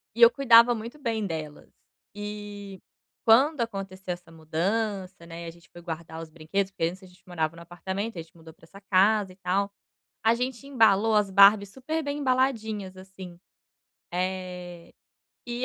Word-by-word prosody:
E 235 Hz, -, -4 dB
eu 235 Hz, -, +11 dB
cuidava 240 Hz, -2 st, +6 dB
muito 235 Hz, +6 st, -8 dB
bem 225 Hz, -5 st, -2 dB
delas. 155 Hz, -4 st, -6 dB, 0.4 s
E 205 Hz, -2 st, -7 dB, 0.5 s
quando 265 Hz, +5 st, +5 dB
aconteceu 195 Hz, -4 st, -4 dB
essa 175 Hz, -1 st, -13 dB
mudança, 185 Hz, +3 st, -2 dB
né, 170 Hz, 0 st, -8 dB
e -, -, -7 dB
a -, -, -6 dB
gente 170 Hz, 0 st, -21 dB
foi 175 Hz, -, -12 dB
guardar 165 Hz, -1 st, -7 dB
os 160 Hz, -, -9 dB
brinquedos, 180 Hz, +5 st, -2 dB
porque 165 Hz, -, -1 dB
antes 185 Hz, +3 st, -4 dB
a -, -, -12 dB
gente 180 Hz, 0 st, -22 dB
morava 165 Hz, -2 st, -2 dB
num 170 Hz, -, -12 dB
apartamento, 190 Hz, +5 st, -5 dB
e -, -, -6 dB
a -, -, -3 dB
gente 160 Hz, +1 st, -17 dB
mudou 160 Hz, -1 st, -14 dB
para 165 Hz, -, -20 dB
essa 195 Hz, +4 st, -15 dB
casa 195 Hz, 0 st, +3 dB
e -, -, -21 dB
tal, 195 Hz, +2 st, -1 dB, 0.5 s
a 225 Hz, -, +6 dB
gente 250 Hz, +2 st, -3 dB
embalou 220 Hz, -4 st, +4 dB
as 205 Hz, -2 st, +3 dB
Barbies 200 Hz, +1 st, +6 dB
super 310 Hz, +8 st, -3 dB
bem 285 Hz, 0 st, -3 dB
embaladinhas 220 Hz, -8 st, 0 dB
assim. 185 Hz, -2 st, -11 dB, 0.7 s
Eh, 180 Hz, -1 st, -4 dB, 0.5 s
e 240 Hz, +1 st, -3 dB
195 Hz, 175 wpm, -27 LUFS, 175-225 Hz, 0.7 s, eu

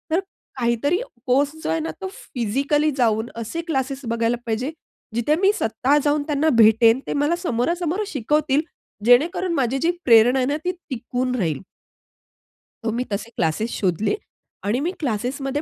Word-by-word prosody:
तर -, -, +3 dB, 0.4 s
काहीतरी 240 Hz, -, +1 dB, 0.3 s
कोर्स 275 Hz, +3 st, +2 dB
जो -, -, -2 dB
आहे 325 Hz, -, +1 dB
ना, 320 Hz, -, -3 dB
तो 380 Hz, -, -3 dB, 0.3 s
फिजिकली 280 Hz, +7 st, +1 dB
जाऊन 225 Hz, -1 st, +1 dB
असे 230 Hz, +9 st, -4 dB
क्लासेस 270 Hz, -2 st, -1 dB
बघायला 230 Hz, +1 st, 0 dB
पाहिजे, 235 Hz, +5 st, -2 dB, 0.4 s
जिथे 240 Hz, +6 st, +2 dB
मी 390 Hz, -, +5 dB
स्वतः 250 Hz, +6 st, +1 dB
जाऊन 290 Hz, 0 st, +2 dB
त्यांना 305 Hz, +1 st, +2 dB
भेटेन. 225 Hz, +3 st, +5 dB
ते -, -, -1 dB
मला 290 Hz, +4 st, +1 dB
समोरासमोरं 340 Hz, -, 0 dB
शिकवतील. 295 Hz, -, +1 dB, 0.4 s
जेणेकरून 335 Hz, +8 st, +4 dB
माझी 265 Hz, -3 st, +1 dB
जी 330 Hz, +6 st, +2 dB
प्रेरणा 240 Hz, +2 st, +6 dB
आहे 255 Hz, -, +2 dB
ना, 290 Hz, -, 0 dB
ती 360 Hz, -, +2 dB, 0.2 s
टिकून 250 Hz, 0 st, -2 dB
राहील. 165 Hz, -, -1 dB, 1.2 s
तर 225 Hz, -, 0 dB
मी 240 Hz, +2 st, -1 dB
तसे 210 Hz, +3 st, -3 dB
क्लासेस 175 Hz, +8 st, 0 dB
शोधले 195 Hz, -, +1 dB, 0.5 s
आणि 220 Hz, +6 st, +1 dB
मी 335 Hz, +5 st, -1 dB
क्लासेसमध्ये 270 Hz, +3 st, -2 dB
255 Hz, 155 wpm, -22 LUFS, 230-295 Hz, 1.2 s, प्रेरणा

